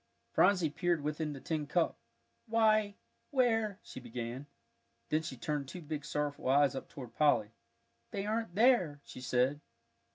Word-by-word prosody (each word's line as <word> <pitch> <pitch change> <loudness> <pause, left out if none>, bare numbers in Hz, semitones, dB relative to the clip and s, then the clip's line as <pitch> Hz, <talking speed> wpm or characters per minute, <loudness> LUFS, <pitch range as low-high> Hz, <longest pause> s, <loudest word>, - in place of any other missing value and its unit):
Phronsie 180 -7 +4
peered 170 -1 0
within 150 0 -2
the 135 - -8
tin 155 0 -3
cup. 165 +2 +1 0.5
"Why 215 -2 +3 0.3
where 225 -7 +2
" - - -41
she - - -9
began. 120 +2 -6 0.6
Then 155 +1 +2
she 135 -5 -6
turned 145 +2 -2
two 180 +1 -8
big 150 -1 -5
sorrowful 145 -3 -2
eyes 140 0 +5
up 135 - -6
toward 125 -5 -9
Polly. 145 -8 +3 0.6
"They 200 0 -3
aren't 220 -4 -2
there," 215 - +4
she 125 - -10
said. 130 +4 +1
150 Hz, 155 wpm, -33 LUFS, 140-200 Hz, 0.6 s, eyes